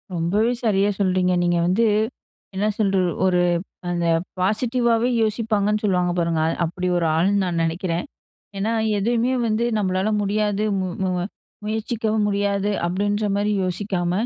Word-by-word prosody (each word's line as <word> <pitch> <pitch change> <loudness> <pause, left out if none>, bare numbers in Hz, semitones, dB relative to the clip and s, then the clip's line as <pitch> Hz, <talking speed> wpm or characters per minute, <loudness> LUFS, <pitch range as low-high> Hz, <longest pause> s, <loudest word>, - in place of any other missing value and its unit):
ரொம்பவே 200 +8 +1
சரியா 205 -2 +2
சொல்றீங்க. 185 -1 +2
நீங்க 175 0 +2
வந்து 220 +6 +2 0.7
என்ன 205 +2 0
சொல்லுறது, 195 -3 +2 0.3
ஒரு 180 -1 +3 0.5
அந்த 175 -1 -1 0.3
பாசிட்டிவாவே 235 +4 +1
யோசிப்பாங்கன்னு 215 -1 0
சொல்லுவாங்க 180 -3 +1
பாருங்க 165 -2 +1 0.2
அப்டி 180 +2 -2
ஒரு 170 - 0
ஆளுன்னு 195 +4 +2
நான் 170 -2 -1
நினைக்கிறேன். 170 +1 -2 0.5
ஏனா, 220 +3 0 0.3
எதுவுமே 235 +4 +1
வந்து 220 +2 0
நம்மளால 190 +1 0
முடியாது 210 +1 0 0.2
மு 185 - -1 0.2
மு 185 - 0 0.5
முயற்சிக்கவும் 220 0 -1
முடியாது 200 0 0 0.2
அப்டின்ற 205 +4 -1
மாரி 205 +1 0
யோசிக்காம, 180 -1 -1
200 Hz, 125 wpm, -22 LUFS, 180-215 Hz, 0.7 s, ஒரு